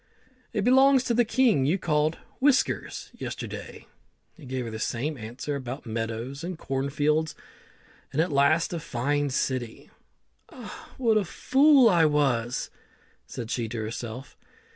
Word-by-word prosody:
"It 205 - -1
belongs 265 +2 +5
to 245 - 0
the 240 +1 +4
king 225 - +3
you 170 +6 +2
called 155 -3 0 0.2
Whiskers 275 0 +1
yesterday." - - -7 0.5
He 155 -7 -13
gave 130 -1 -3
her 115 - -5
the 110 - -6
same 135 +7 -2
answer 125 +5 -5
about 130 0 -6
meadows 115 +5 -4
and 175 0 -4
corn 135 -2 -2
fields, 150 +2 0 0.8
and 145 - -2
at 165 +1 +2
last 145 +5 +3
a 170 - -2
fine 145 +1 -1
city. 130 -3 -3 0.6
"Ah, 310 +7 -10
what 225 -4 +3
a - - -1
fool 270 - +4
I 175 -6 +5
was!" 125 -5 0 0.6
said 115 -1 -6
she 115 -3 -2
to 120 - -5
herself. 115 +3 -6
145 Hz, 145 wpm, -26 LUFS, 125-200 Hz, 0.8 s, belongs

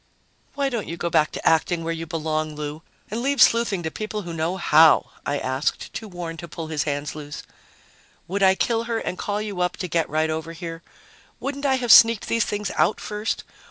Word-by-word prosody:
"Why 280 -1 0
don't 235 -5 -3
you 170 - -5
go 170 0 -2
back 155 0 +3
to - - -3
acting, 165 +1 +2
where 165 +1 -1
you 165 0 -6
belong, 155 -1 -2
Lou, 150 +1 -5 0.3
and 225 +2 -2
leave 280 +1 0
sleuthing 230 -6 +4
to 160 - -3
people 215 +1 -4
who 170 -1 -6
know 165 +3 -1
how?" 160 -3 +5 0.2
I 145 - 0
asked, 130 +2 -2
too 220 - -6
worn 175 -3 -6
to 170 - -8
pull 160 0 -7
his 150 -3 -1
hands 145 -1 -2
loose. 150 -1 -8 0.8
"Would 200 +3 -2
I 190 -1 +6
kill 230 +3 0
her 230 -1 -1
and 180 - -3
call 205 +1 -2
you 200 -4 -4
up 180 - 0
to 180 - -3
get 165 -1 0
right 155 +1 +1
over 160 +1 -4
here? 165 -1 -7 0.6
Wouldn't 280 +1 -3
I 265 - +3
have 245 -3 +1
sneaked 230 -1 +7
these 230 -1 +2
things 205 -1 -3
out - - +2
first? 210 +1 -3
170 Hz, 215 wpm, -23 LUFS, 160-215 Hz, 0.8 s, sneaked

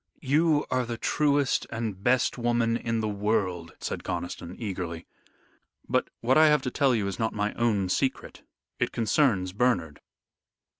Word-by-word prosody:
You 150 +2 +3
are 130 0 +1
the 120 -1 -5
truest 145 +1 +1
and 110 -4 -4
best 125 +2 +2
woman 120 -1 +1
in 115 -1 -1
the 110 - -1
world," 100 -5 -1
said - - -4
Conniston, 90 0 -5
eagerly, 90 -6 -5 0.8
"but - - 0
what 130 +5 +4
I 155 - +7
have 150 -2 +3
to 125 - -2
tell 135 -2 +2
you 105 -3 0
is 100 -1 -4
not 110 -1 -1
my 105 0 -1
own 105 -5 +1
secret. 130 +9 -2 0.4
It - - 0
concerns 110 -5 +1
Bernard." 100 -10 0
115 Hz, 155 wpm, -27 LUFS, 100-130 Hz, 0.8 s, I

